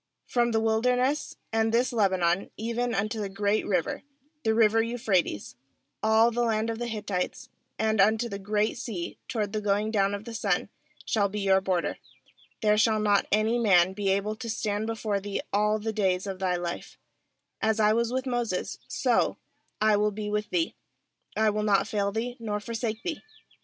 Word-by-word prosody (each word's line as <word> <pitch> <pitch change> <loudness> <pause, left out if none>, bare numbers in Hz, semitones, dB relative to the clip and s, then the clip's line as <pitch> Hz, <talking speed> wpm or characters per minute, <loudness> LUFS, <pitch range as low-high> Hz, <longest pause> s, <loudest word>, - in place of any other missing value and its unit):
4From 240 -1 +1
the 225 - +2
wilderness, 250 +6 +1 0.2
and 225 0 +2
this 240 +2 +2
Lebanon, 190 -4 +2
even 235 +2 -1
unto 215 +2 -1
the 200 - -3
great 200 +2 0
river, 180 -5 0 0.4
the 220 -1 +2
river 225 0 +4
Euphrates, 215 - -1 0.5
all 220 +2 +4
the 240 +1 -1
land 225 -1 +1
of 225 - -5
the 240 - -2
Hittites, 205 -5 -3 0.3
and 220 -1 +2
unto 220 +4 +3
the 200 -3 -5
Great 210 +3 0
Sea 200 -9 -5
toward 215 -5 -2
the 215 - -1
going 205 +1 +1
down 200 -2 +2
of 205 - -8
the 235 - -7
sun, 200 -4 0 0.4
shall 205 -3 +1
be 210 +1 -4
your 190 -1 +4
border, 185 -3 -1 0.6
^here 210 0 +4
shall 220 -2 +3
not 205 -1 +2
any 220 +3 +2
man 190 -5 +4
be 200 0 -1
able 200 +2 0
to 230 0 -6
stand 215 -1 -1
before 220 -3 -1
thee 200 0 -4
all 210 +1 +3
the 220 +1 -3
days 190 -3 +1
of 190 -2 -5
thy 185 -2 +1
life; 175 -1 -5 0.6
as 220 0 +1
I 215 0 +5
was 235 +1 +1
with 260 +1 -1
Moses, 240 -7 -2
so - - +1 0.4
I 215 -1 +4
will 210 +1 +2
be 210 0 -5
with 210 0 -1
thee; 335 -2 0 0.6
I 215 0 +4
will 210 +1 -1
not 205 -2 +2
fail 200 -1 0
thee, 240 +4 -3
nor 210 -2 -2
forsake 225 +1 -4
thee. 330 -4 -3
215 Hz, 185 wpm, -27 LUFS, 200-225 Hz, 0.6 s, I